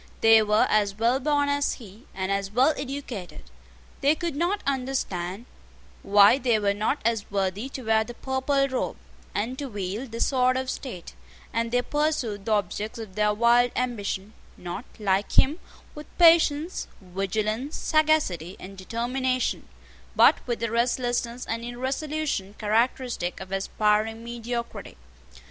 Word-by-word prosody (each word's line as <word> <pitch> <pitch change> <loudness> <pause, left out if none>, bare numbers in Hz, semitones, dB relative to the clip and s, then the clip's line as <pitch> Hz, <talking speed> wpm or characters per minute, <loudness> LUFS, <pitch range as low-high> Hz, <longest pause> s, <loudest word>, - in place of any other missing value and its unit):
They 225 0 +7
were 210 0 +3
as 205 -2 +2
well 235 +4 +2
born 290 +1 +1
as 285 0 +1
he, 220 -1 -13
and 190 0 -2
as 195 0 -1
well 255 +9 +3
educated: 265 -9 -6 0.6
they 290 +2 +3
could 335 -2 -3
not 350 +7 0
understand 245 -8 -2 0.6
why 205 +5 +6
they 240 -4 +2
were 200 -1 +1
not 215 +8 0
as 230 -3 0
worthy 195 +4 -1
to 265 -1 -7
wear 220 -1 +3
the 240 +2 -9
purple 275 +2 0
robe, 260 -1 -2 0.4
and 235 +6 -2
to 280 -2 -4
wield 205 +4 -4
the 230 - -5
sword 255 -1 +2
of 260 0 -2
state; 210 -11 -7 0.4
and 230 0 0
they 245 0 +2
pursued 295 -10 -1
the 225 - -2
objects 210 +1 -1
of 220 -4 -8
their 210 +1 +2
wild 235 +3 +4
ambition, 215 -4 -2 0.2
not, 180 +7 -6
like 200 -2 0
him, 300 +6 +4 0.3
with 300 0 -10
patience, 330 -1 +4
vigilance, 215 - -2
sagacity, 300 - +1
and 195 +1 -10
determination, 250 +5 -1 0.5
but - - +6
with 240 -2 -2
the 230 -2 -1
restlessness 240 0 0
and 230 +1 -3
irresolution 260 -3 -3
characteristic 225 -3 0
of 190 0 -9
aspiring 215 +3 0
mediocrity. 235 0 -5
235 Hz, 145 wpm, -26 LUFS, 205-265 Hz, 0.6 s, They